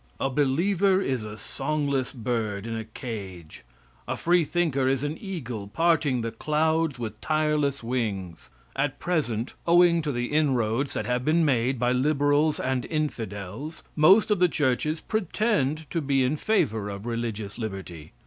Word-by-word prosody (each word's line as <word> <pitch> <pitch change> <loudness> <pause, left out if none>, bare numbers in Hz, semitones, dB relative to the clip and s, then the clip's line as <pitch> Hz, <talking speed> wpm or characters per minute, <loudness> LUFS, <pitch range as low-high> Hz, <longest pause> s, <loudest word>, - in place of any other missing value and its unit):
A 135 - 0
believer 180 +8 +2
is 130 - -1
a 105 0 -7
songless 140 0 -2
bird 110 -4 -2
in 115 -1 -3
a 110 - -3
cage, 100 -8 -8 0.4
a - - -2
freethinker 165 -5 +2
is 135 0 +1
an 145 +1 -2
eagle 125 - -5
parting 155 -1 +2
the 115 0 -3
clouds 155 +3 0
with 115 -3 -6
tireless 150 -3 0
wings. 105 -8 -3 0.3
At 135 0 -1
present, 135 -10 -1
owing 170 0 +5
to 150 -2 -2
the 120 0 -2
inroads 130 -3 +1
that - - -2
have 125 0 0
been 160 +3 +3
made 130 -1 +1
by 120 +1 +1
liberals 145 +3 +2
and 130 -1 -1
infidels, 120 - -4
most 190 +8 +6
of 205 - +3
the 180 -1 +5
churches 150 +2 0
pretend 185 - 0
to 165 - 0
be 135 -2 +2
in 130 +4 +1
favor 110 - 0
of 100 +1 -7
religious 115 -3 -4
liberty. 95 -8 -6
135 Hz, 150 wpm, -26 LUFS, 115-155 Hz, 0.4 s, most